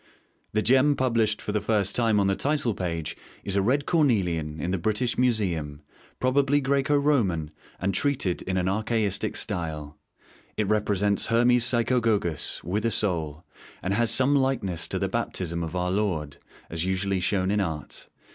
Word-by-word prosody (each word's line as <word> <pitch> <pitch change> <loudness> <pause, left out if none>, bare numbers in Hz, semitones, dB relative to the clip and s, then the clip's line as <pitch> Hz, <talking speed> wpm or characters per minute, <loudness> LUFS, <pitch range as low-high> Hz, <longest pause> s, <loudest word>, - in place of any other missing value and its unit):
The 105 0 +1
gem 135 +3 +4
published 115 -5 +1
for - - -3
the 105 0 0
first 105 -2 +1
time 115 -3 +2
on 100 - +2
the 95 0 +2
title 140 -4 0
page 85 -5 -3 0.3
is 100 - -2
a 100 - +3
red 135 +8 +1
cornelian 90 - +1
in 85 +5 -2
the 95 - -1
British 110 +6 0
Museum, 85 -12 0 0.4
probably 140 +2 +2
Graeco 140 +1 +1
Roman, 100 - +1 0.3
and 100 +3 -1
treated 130 -11 0
in 95 0 -2
an 90 0 0
archaistic 105 0 -1
style. 80 -8 -3 0.6
It 105 - 0
represents 105 -1 +1
Hermes 120 +1 +4
Psychogogos, 115 - +1
with 100 +6 -2
a 115 - +2
Soul, 85 -7 -1 0.4
and 95 - 0
has 115 +2 +2
some 130 +5 +3
likeness 115 - 0
to - - -3
the - - 0
Baptism 85 -2 -2
of 80 +1 -5
Our 90 0 -1
Lord, 90 -8 -1 0.3
as 80 0 -3
usually 95 +1 -1
shown 95 +1 0
in 105 - +1
art. 80 -6 -5
100 Hz, 165 wpm, -26 LUFS, 90-120 Hz, 0.6 s, gem